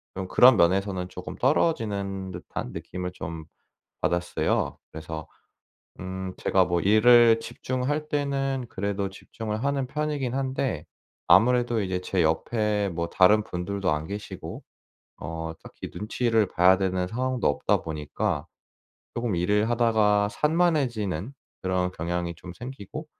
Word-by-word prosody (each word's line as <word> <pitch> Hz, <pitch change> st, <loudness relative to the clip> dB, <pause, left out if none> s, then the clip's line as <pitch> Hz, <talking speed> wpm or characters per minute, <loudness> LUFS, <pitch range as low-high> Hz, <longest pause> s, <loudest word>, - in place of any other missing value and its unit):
좀 95 Hz, 0 st, -4 dB
그런 125 Hz, +3 st, +7 dB
면에서는 95 Hz, +1 st, +2 dB
조금 -, -, -8 dB
떨어지는 100 Hz, -, 0 dB
듯한 90 Hz, -7 st, -6 dB
느낌을 90 Hz, 0 st, -5 dB
좀 80 Hz, -2 st, -6 dB, 0.6 s
받았어요. 85 Hz, 0 st, 0 dB
그래서 80 Hz, 0 st, -6 dB, 0.7 s
음 95 Hz, 0 st, -5 dB
제가 95 Hz, -1 st, +3 dB
뭐 85 Hz, -1 st, +1 dB
일을 115 Hz, +3 st, +6 dB
집중할 130 Hz, +6 st, -3 dB
때는 135 Hz, -3 st, -1 dB
그래도 100 Hz, -1 st, -2 dB
집중을 110 Hz, +3 st, -5 dB
하는 140 Hz, -1 st, 0 dB
편이긴 145 Hz, -3 st, -2 dB
한데 130 Hz, -, -1 dB, 0.4 s
아무래도 120 Hz, +5 st, +4 dB
이제 95 Hz, -1 st, -2 dB
제 90 Hz, -1 st, 0 dB
옆에 105 Hz, +5 st, +1 dB
뭐 85 Hz, -1 st, -3 dB
다른 105 Hz, +3 st, +5 dB
분들도 95 Hz, 0 st, -2 dB
안 75 Hz, +1 st, -2 dB
계시고 105 Hz, +1 st, -7 dB, 0.6 s
어 80 Hz, +1 st, -4 dB
딱히 -, -, -9 dB
눈치를 110 Hz, 0 st, +1 dB
봐야 90 Hz, +2 st, +5 dB
되는 95 Hz, -1 st, 0 dB
상황도 130 Hz, +3 st, -1 dB
없다 70 Hz, -, +1 dB
보니까 75 Hz, -2 st, -3 dB, 0.7 s
조금 120 Hz, -4 st, -1 dB
일을 105 Hz, +5 st, +2 dB
하다가 110 Hz, -3 st, +3 dB
산만해지는 130 Hz, -, 0 dB, 0.3 s
그런 90 Hz, -1 st, 0 dB
경향이 85 Hz, 0 st, -3 dB
좀 90 Hz, +1 st, -10 dB
생기고 130 Hz, -, -8 dB
100 Hz, 280 characters per minute, -26 LUFS, 90-120 Hz, 0.7 s, 그런